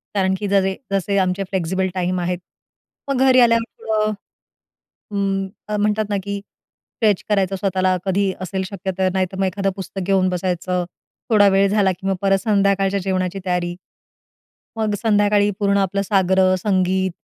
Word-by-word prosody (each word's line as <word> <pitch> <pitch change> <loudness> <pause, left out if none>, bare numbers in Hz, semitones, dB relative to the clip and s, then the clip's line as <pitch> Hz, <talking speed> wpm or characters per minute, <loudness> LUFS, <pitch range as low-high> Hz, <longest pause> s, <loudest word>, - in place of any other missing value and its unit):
कारण 190 -1 +2
की 205 - -2
जजे 195 -1 +2 0.2
जसे 195 +1 0
आमचे 185 +1 0
फ्लेक्सिबल 190 0 -1
टाईम 180 0 -1
आहेत, 180 0 -1 0.7
मग 275 -2 0
घरी 255 -1 +6
आल्यावर 230 -1 +4 0.2
थोडं. 215 -1 0 1.0
उम, 195 -1 -1 0.3
म्हणतात 210 +1 +1
ना 205 - 0
की 200 0 -3
स्ट्रेच 205 0 -3
करायचं 195 -2 +1
स्वतःला 185 -1 +1
कधी 195 0 +1
असेल 190 +1 -3
शक्य 195 -1 -4
तर 190 -1 +2
नाहीतर 190 0 -1
मग 195 - +2
एखादं 195 +1 -1
पुस्तक 195 0 -6
घेऊन 190 -1 +3
बसायचं. 180 0 -1 0.4
थोडा 210 -3 +5
वेळ 195 +1 +4
झाला, 200 -2 +3
की 185 +1 -6
मग 195 - +1
परत 195 -1 +3
संध्याकाळच्या 200 -2 +2
जेवणाची 185 0 -1
तयारी. 175 -1 -1 1.0
मग 215 -2 0
संध्याकाळी 205 -2 +3
पूर्ण 200 -2 +2
आपलं 200 0 0
साग्र-संगीत 190 -1 +2
195 Hz, 150 wpm, -20 LUFS, 185-200 Hz, 1.0 s, घरी